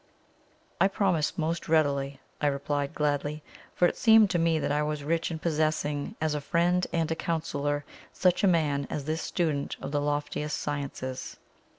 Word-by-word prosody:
"I 195 Hz, -, +7 dB
promise 190 Hz, -4 st, 0 dB
most 165 Hz, 0 st, -2 dB
readily," 140 Hz, -3 st, +2 dB, 0.2 s
I 150 Hz, -, +3 dB
replied 140 Hz, 0 st, -1 dB
gladly, 150 Hz, 0 st, -1 dB, 0.3 s
for 175 Hz, -, +5 dB
it -, -, -2 dB
seemed 220 Hz, -3 st, +6 dB
to 175 Hz, -, +1 dB
me 165 Hz, -1 st, +3 dB
that 145 Hz, -, -1 dB
I 150 Hz, +1 st, +2 dB
was 150 Hz, -1 st, -2 dB
rich 165 Hz, +3 st, 0 dB
in 165 Hz, -, -3 dB
possessing 155 Hz, +1 st, -1 dB
as 155 Hz, -1 st, 0 dB
a 150 Hz, -, -2 dB
friend 175 Hz, +4 st, +1 dB
and 165 Hz, -1 st, 0 dB
counsellor 145 Hz, -3 st, -1 dB, 0.3 s
such 180 Hz, 0 st, +2 dB
a -, -, +6 dB
man 145 Hz, -6 st, +2 dB
as 145 Hz, -, -4 dB
this 160 Hz, +1 st, -1 dB
student 155 Hz, -5 st, -1 dB
of 135 Hz, -, -6 dB
the 145 Hz, -1 st, 0 dB
loftiest 145 Hz, +1 st, -2 dB
sciences. 140 Hz, -3 st, -4 dB
150 Hz, 170 wpm, -28 LUFS, 145-170 Hz, 0.3 s, I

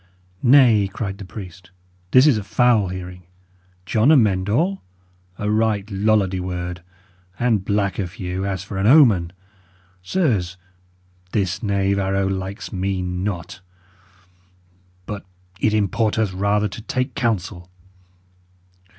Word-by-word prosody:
"Nay," 120 Hz, -6 st, +5 dB
cried 100 Hz, -1 st, -5 dB
the 100 Hz, -, -8 dB
priest, 90 Hz, -2 st, -10 dB, 0.4 s
"this 130 Hz, +6 st, +6 dB
is 150 Hz, -5 st, +5 dB
a -, -, -6 dB
foul 115 Hz, 0 st, +2 dB
hearing! 90 Hz, 0 st, -7 dB, 0.6 s
John 110 Hz, +8 st, +3 dB
Amend 105 Hz, -9 st, +3 dB
All! 175 Hz, -, 0 dB, 0.6 s
A 105 Hz, 0 st, -2 dB
right 110 Hz, -2 st, +1 dB
Lollardy 100 Hz, -2 st, +1 dB
word. 90 Hz, -1 st, -5 dB, 0.6 s
And 115 Hz, -5 st, +1 dB
black 100 Hz, -1 st, -1 dB
of 90 Hz, -3 st, -3 dB
hue, 95 Hz, -3 st, -4 dB
as 95 Hz, -2 st, -3 dB
for 95 Hz, 0 st, -6 dB
an 100 Hz, -, +1 dB
omen! 110 Hz, -, +5 dB, 0.7 s
Sirs, 95 Hz, -, 0 dB, 0.8 s
this 95 Hz, -4 st, -1 dB
knave 100 Hz, -2 st, 0 dB
arrow 95 Hz, 0 st, 0 dB
likes 95 Hz, +3 st, -5 dB
me 95 Hz, 0 st, -2 dB
not. 90 Hz, 0 st, -4 dB, 1.4 s
But 105 Hz, -1 st, -6 dB, 0.4 s
it 110 Hz, -, +2 dB
importeth 110 Hz, 0 st, 0 dB
rather 100 Hz, +2 st, +1 dB
to 105 Hz, -, -8 dB
take 125 Hz, +4 st, -2 dB
counsel. 100 Hz, -8 st, -2 dB
100 Hz, 120 wpm, -21 LUFS, 95-110 Hz, 1.4 s, this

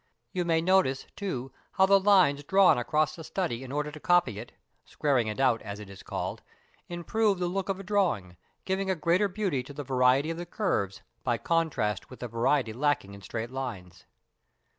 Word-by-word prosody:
You 180 Hz, -1 st, -1 dB
may 165 Hz, -1 st, +2 dB
notice, 175 Hz, -7 st, +2 dB
too, 135 Hz, -, -4 dB, 0.2 s
how 190 Hz, -, +5 dB
the 195 Hz, 0 st, +5 dB
lines 185 Hz, -8 st, +4 dB
drawn 195 Hz, +4 st, +5 dB
across 155 Hz, +5 st, 0 dB
a -, -, -7 dB
study 155 Hz, -8 st, -3 dB
in 130 Hz, -, -8 dB
order 150 Hz, +1 st, -2 dB
to 155 Hz, -, -10 dB
copy 175 Hz, -, +2 dB
it 115 Hz, -, -9 dB, 0.3 s
(squaring 135 Hz, -6 st, 0 dB
it 110 Hz, +4 st, -4 dB
out, 130 Hz, -4 st, +3 dB
as 100 Hz, 0 st, -7 dB
it 100 Hz, -2 st, -10 dB
is 100 Hz, -, -11 dB
called) -, -, -4 dB, 0.5 s
improve 195 Hz, +4 st, 0 dB
the 180 Hz, 0 st, -1 dB
look 190 Hz, +2 st, -2 dB
of 195 Hz, 0 st, -1 dB
a -, -, -7 dB
drawing, 180 Hz, -, 0 dB, 0.3 s
giving 190 Hz, 0 st, -1 dB
a 190 Hz, -, +2 dB
greater 175 Hz, +5 st, +2 dB
beauty 190 Hz, -8 st, -1 dB
to 135 Hz, +3 st, -11 dB
the 145 Hz, +1 st, -5 dB
variety 130 Hz, +3 st, +3 dB
of 165 Hz, -, -5 dB
the 175 Hz, 0 st, -6 dB
curves 100 Hz, -, -1 dB, 0.2 s
by 120 Hz, -2 st, +1 dB
contrast 135 Hz, -, 0 dB
with 130 Hz, -, -12 dB
the 125 Hz, -, -3 dB
variety 115 Hz, +1 st, +1 dB
lacking 130 Hz, -6 st, 0 dB
in 100 Hz, -, -11 dB
straight 115 Hz, +5 st, -5 dB
lines. 115 Hz, -10 st, -6 dB
150 Hz, 195 wpm, -28 LUFS, 120-185 Hz, 0.5 s, how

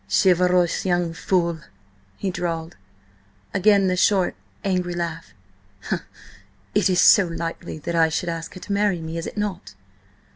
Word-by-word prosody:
"Chivalrous 180 Hz, -, +3 dB
young 175 Hz, -2 st, 0 dB
fool," 170 Hz, -1 st, 0 dB, 0.6 s
he 195 Hz, -, -2 dB
drawled. 165 Hz, -2 st, -4 dB, 0.8 s
Again 200 Hz, +1 st, +4 dB
the 185 Hz, -1 st, +1 dB
short, 185 Hz, -, +2 dB, 0.3 s
angry 180 Hz, -2 st, -1 dB
laugh. 165 Hz, -1 st, -5 dB, 1.4 s
"It -, -, +3 dB
is 180 Hz, -1 st, +2 dB
so 200 Hz, +1 st, +7 dB
likely 165 Hz, -1 st, -5 dB
that 165 Hz, +3 st, -5 dB
I 165 Hz, -1 st, +4 dB
should 160 Hz, +2 st, -2 dB
ask 165 Hz, -1 st, -5 dB
her -, -, -8 dB
to 200 Hz, -, -4 dB
marry 200 Hz, -3 st, +1 dB
me, 160 Hz, +1 st, -5 dB
is 165 Hz, -, -5 dB
it -, -, -8 dB
not? 205 Hz, -2 st, -4 dB
175 Hz, 145 wpm, -23 LUFS, 165-190 Hz, 1.4 s, so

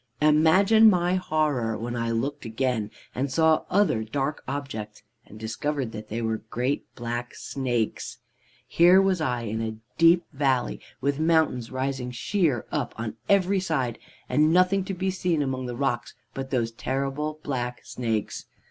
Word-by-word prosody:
Imagine 185 Hz, +9 st, +6 dB
my 180 Hz, -2 st, +2 dB
horror 150 Hz, -11 st, 0 dB
when 120 Hz, +2 st, -4 dB
I 115 Hz, -1 st, -1 dB
looked 135 Hz, +6 st, -2 dB
again 115 Hz, -2 st, -1 dB, 0.2 s
and 130 Hz, +2 st, -2 dB
saw 160 Hz, +2 st, +3 dB
other 185 Hz, -, +2 dB
dark 135 Hz, +6 st, -2 dB
objects, 120 Hz, -7 st, -5 dB, 0.2 s
and 105 Hz, -, -12 dB
discovered 125 Hz, +3 st, -2 dB
that 110 Hz, -1 st, -8 dB
they 115 Hz, +2 st, -3 dB
were 110 Hz, 0 st, 0 dB
great 125 Hz, +5 st, -1 dB
black 120 Hz, 0 st, -4 dB
snakes. 120 Hz, -5 st, -2 dB, 0.5 s
"Here 175 Hz, +3 st, +6 dB
was 190 Hz, -3 st, +2 dB
I, 125 Hz, -5 st, 0 dB
in 110 Hz, 0 st, -3 dB
a 110 Hz, -1 st, -3 dB, 0.2 s
deep 165 Hz, +1 st, +6 dB
valley, 135 Hz, -3 st, 0 dB, 0.2 s
with 140 Hz, +2 st, 0 dB
mountains 160 Hz, -7 st, +2 dB
rising 130 Hz, -1 st, -2 dB
sheer 135 Hz, -, 0 dB
up -, -, -2 dB
on 110 Hz, -1 st, -5 dB
every 195 Hz, 0 st, +3 dB
side, 135 Hz, -10 st, -1 dB, 0.3 s
and 155 Hz, +1 st, +3 dB
nothing 185 Hz, +2 st, +4 dB
to 195 Hz, -, -4 dB
be 190 Hz, +1 st, -1 dB
seen 175 Hz, -5 st, 0 dB
among 130 Hz, -2 st, -3 dB
the 120 Hz, -, -4 dB
rocks 120 Hz, -3 st, -2 dB, 0.2 s
but 135 Hz, 0 st, -5 dB
those 120 Hz, -4 st, 0 dB
terrible 140 Hz, +5 st, -3 dB
black 125 Hz, -3 st, -3 dB
snakes. 115 Hz, -4 st, -3 dB
135 Hz, 155 wpm, -26 LUFS, 120-160 Hz, 0.5 s, Imagine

